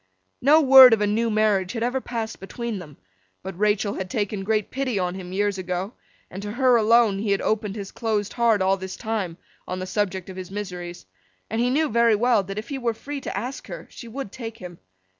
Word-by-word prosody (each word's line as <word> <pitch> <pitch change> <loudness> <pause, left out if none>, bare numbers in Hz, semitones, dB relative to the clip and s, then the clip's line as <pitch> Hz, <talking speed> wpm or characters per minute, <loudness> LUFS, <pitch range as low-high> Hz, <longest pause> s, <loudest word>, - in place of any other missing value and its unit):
No 300 +5 +6
word 265 -3 +9
of 220 - +2
a - - +3
new 225 +3 +1
marriage 210 -3 +1
had 230 -2 -2
ever 250 +2 -1
passed 225 -3 -5
between 225 +2 -5
them; 150 -5 -12 0.5
but 190 0 -6
Rachael 210 -1 +1
had 185 -1 -5
taken 205 -1 -2
great 215 0 0
pity 260 -5 -2
on 180 -1 -1
him 185 -1 -8
years 200 0 0
ago, 185 +3 -3 0.4
and 190 - -7
to 205 0 -5
her 255 0 +4
alone 225 -2 +4
he 210 +1 -2
had 200 - +1
opened 215 -2 -1
his 200 -3 -6
closed 215 -3 -2
heart 230 -5 +2
all 190 +1 +2
this 190 0 -6
time, 210 -7 -3 0.3
on 185 - -3
the 185 - -4
subject 190 -2 -2
of 190 -1 -9
his 185 -1 -7
miseries; 180 -3 -6 0.5
and 225 +1 0
he 245 - +2
knew 305 +5 +2
very 235 -2 +3
well 235 0 +3
that 195 +1 -7
if 215 +2 -5
he 275 -2 -4
were 235 -3 -1
free 280 +4 -6
to - - -5
ask 250 +5 -5
her, - - -8
she 235 - -10
would 235 -2 -6
take 230 -3 -7
him. 175 -4 -10
210 Hz, 225 wpm, -24 LUFS, 190-235 Hz, 0.5 s, word